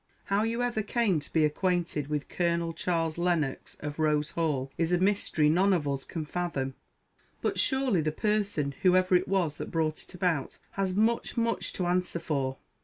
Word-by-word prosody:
How 200 +1 +1
you 230 +2 0
ever 240 -3 0
_came 210 -5 +1
_to 145 - -11
be 160 -2 +3
acquainted 170 -2 0
with 150 -1 -2
Colonel 170 -1 0
Charles 165 -1 -1
Lennox 170 -6 -1
of 145 +1 -5
Rose 150 0 +1
Hall 145 -5 -1
is 165 0 0
a 180 - +4
mystery 185 -5 +2
none 185 +6 +4
of 155 -5 0
us 140 -1 -2
can 160 -2 -5
fathom; 150 -5 -2 0.7
but - - -1
surely 265 - +3
the 155 0 0
person, 200 -6 0
_whoever 185 0 +4
_it 180 -1 +3
was 180 -6 0
that - - -4
brought 160 -2 -1
it - - -12
about, 170 -6 -1
has 190 -2 -1
much, 225 +4 +1
much 230 -1 +1
to 180 - -2
answer 180 0 0
for! 140 -5 -2
170 Hz, 180 wpm, -29 LUFS, 150-195 Hz, 0.7 s, a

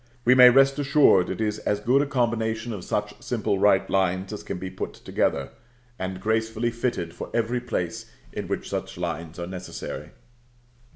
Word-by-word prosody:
We 125 - +7
may 125 -1 +9
rest 135 +2 +4
assured 140 -10 +4
it - - -4
is 105 -1 -1
as 105 -1 -1
good 125 +6 +3
a 145 - -1
combination 115 -3 -1
of 95 -4 -6
such - - -2
simple 100 - -1
right 100 -1 +4
lines 95 +1 0
as 105 - -6
can - - -5
be 95 +1 -6
put - - -5
together, 70 -1 -1 0.5
and 95 0 -4
gracefully 110 +3 0
fitted 115 -8 -2
for - - -7
every 120 +1 +1
place 90 -8 -3 0.2
in - - -4
which - - -3
such - - -4
lines 80 +1 -4
are 85 - -4
necessary. 90 0 -7
110 Hz, 175 wpm, -25 LUFS, 95-120 Hz, 0.5 s, may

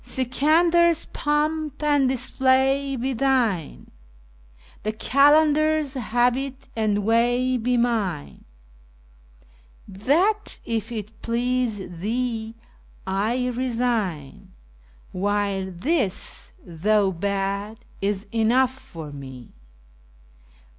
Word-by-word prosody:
Sikandar's3 330 +6 +2
pomp 300 0 -1
and 290 -3 +3
display 265 +2 +1
be 260 +2 -2
thine, 235 - 0 0.9
the 215 - -2
Qalandar's4 295 +3 +3
habit 250 +4 0
and 210 -2 0
way 245 +3 +2
be 245 +1 0
mine; 220 - -1 1.4
That, 325 - 0
if 230 0 -3
it 220 -1 -7
please 235 -7 -2
thee, 225 +2 -2 0.5
I 220 +7 0
resign, 230 - -2 0.6
while 200 0 -1
this, 200 - -2
though 195 +4 +1
bad, 200 +3 -2 0.2
is 200 0 -1
enough 245 +3 +2
for 165 - -10
me. 130 -3 -10
240 Hz, 80 wpm, -23 LUFS, 205-270 Hz, 1.4 s, and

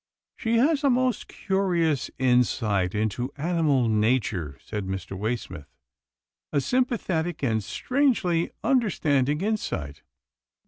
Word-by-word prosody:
" - - -67
She 230 +1 +2
has 285 +4 +3
a 280 - +4
most 255 -2 +1
curious 175 -7 0
insight 115 -7 +1
into 110 +5 -1
animal 150 -5 +1
nature," 105 - 0
said 105 -3 -5
Mr. 95 0 -5
Waysmith. 95 - -4 0.5
" - - -67
A 145 - +2
sympathetic 175 - -1
and 110 -4 +1
strangely 210 - +1
understanding 150 - +1
insight. 190 - -3
140 Hz, 110 wpm, -26 LUFS, -, 0.5 s, a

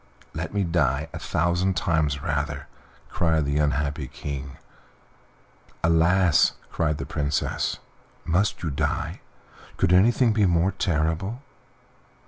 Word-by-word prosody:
"Let - - -4
me 100 -1 0
die 80 -4 0
a - - -5
thousand 85 +2 0
times 75 -4 0
rather," 75 0 -2 0.4
cried 80 -4 +1
the 70 +1 0
unhappy 75 0 0
King. 70 -2 -6 1.3
"Alas!" 85 +1 +4 0.2
cried 75 -2 0
the 70 - -5
Princess, 75 0 -1 0.5
"must 90 +4 0
you 80 - -1
die? 70 - -2 0.6
Could 85 - +2
anything 115 +5 +4
be 105 -2 +3
more 85 +2 +2
terrible?" 90 - -1
80 Hz, 110 wpm, -25 LUFS, 75-90 Hz, 1.3 s, Alas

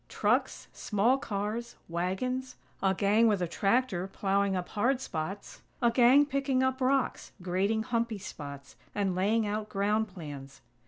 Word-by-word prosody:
Trucks; - - 0
small 230 +6 +1
cars; 215 0 -3
wagons; 250 +10 -2 0.3
a 190 -1 +2
gang 210 +4 +4
with 210 -3 +2
a 175 - -1
tractor 195 0 +1
plowing 195 0 0
up 180 -1 -3
hard 245 +5 +1
spots; 195 -3 -5 0.2
a 235 -2 +3
gang 255 +4 +6
picking 275 -2 0
up 260 0 0
rocks, 265 +1 0
grading 195 +5 0
humpy 235 -2 -1
spots, 140 -7 -9 0.2
and 200 -2 0
laying 210 +5 +1
out 210 +1 -3
ground 210 +2 +1
plans. 145 -8 -9
210 Hz, 145 wpm, -30 LUFS, 190-245 Hz, 0.3 s, gang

